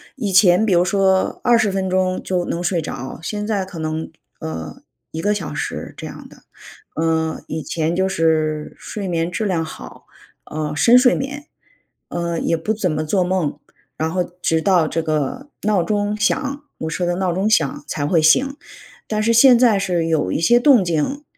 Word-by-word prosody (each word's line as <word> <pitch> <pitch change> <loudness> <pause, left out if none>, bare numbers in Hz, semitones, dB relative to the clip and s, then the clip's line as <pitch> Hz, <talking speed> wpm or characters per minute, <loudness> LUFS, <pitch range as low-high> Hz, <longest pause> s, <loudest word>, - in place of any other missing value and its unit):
以 215 -8 -3
前 185 +1 +5
比 195 - +3
如 175 0 +4
说 190 0 +1
20 235 -4 +3
分 190 -1 -2
钟 185 0 0
就 180 -2 -1
能 170 - -3
睡 175 0 0
着， 130 -4 -6
现 210 +3 -3
在 205 -4 -1
可 180 -3 -9
能， 155 0 -3 0.3
呃， 80 0 -7 0.3
1 160 - -5
个 205 +5 +1
小 195 -6 -4
时 150 - -5
这 - - -7
样 - - -10
的。 - - -18 0.5
呃， 160 0 0
以 155 -1 -4
前 165 +1 -1
就 190 +1 +1
是 155 -4 0
睡 205 -2 -6
眠 170 0 -1
质 220 - -2
量 175 -5 0
好， - - -11 0.4
呃， 150 -1 -4
深 235 +9 +5
睡 250 0 +6
眠， 285 +2 -5 0.6
呃， 170 -1 -2
也 - - 0
不 190 +6 -2
怎 205 -5 0
么 155 0 -1
做 180 +4 +1
梦， 180 -4 -1 0.4
然 160 +1 -1
后 180 +1 0
直 175 -2 -2
到 175 -4 +3
这 165 - -1
个 160 - -2
闹 205 -3 +2
钟 205 +3 -1
响， 275 +7 -1
我 160 - -4
设 180 - -3
的 175 - 0
闹 185 -1 0
钟 195 +4 0
响 155 -11 +1
才 145 - -2
会 160 +2 +2
醒， 260 - +4 0.5
但 215 -1 -1
是 230 +1 +3
现 245 +2 +7
在 235 -4 +4
是 175 -3 0
有 155 - 0
一 - - -1
些 240 +9 +4
动 245 -6 +5
静， 170 - -1
180 Hz, 200 characters per minute, -20 LUFS, 160-210 Hz, 0.6 s, 现